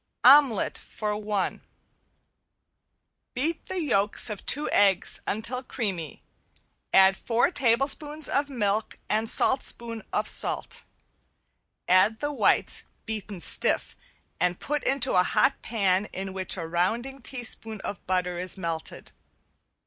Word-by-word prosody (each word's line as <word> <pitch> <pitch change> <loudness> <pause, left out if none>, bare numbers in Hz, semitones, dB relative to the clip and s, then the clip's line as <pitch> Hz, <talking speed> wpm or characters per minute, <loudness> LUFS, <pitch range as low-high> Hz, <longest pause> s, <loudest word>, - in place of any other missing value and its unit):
~OMELET 265 -5 +5
FOR 210 -1 -4
ONE~ 210 -2 -2 1.7
Beat 310 +6 -2
the 375 - -3
yolks 210 -6 +2
of 205 - -6
two 295 +2 +2
eggs 195 -3 +3
until 230 +4 0
creamy, 195 - -5 0.7
add 190 0 +6
four 235 - +1
tablespoons 285 +3 0
of 285 +1 0
milk 215 -4 -1
and 220 +1 0
saltspoon 235 -3 0
of 210 +1 -1
salt. - - 0 1.1
Add 185 +5 +4
the 290 0 -2
whites - - +1 0.2
beaten 210 -4 -5
stiff - - +2 0.4
and 180 0 0
put 295 -1 -2
into 270 -1 +2
a 180 - +5
hot - - +1
pan 200 -3 0
in 190 -1 -6
which 190 0 -3
a 165 - -4
rounding 225 +11 -1
teaspoon 225 -4 -4
of 200 - -6
butter 180 -1 -1
is 185 +2 -2
melted. 165 -3 -5
215 Hz, 120 wpm, -26 LUFS, 190-260 Hz, 1.7 s, add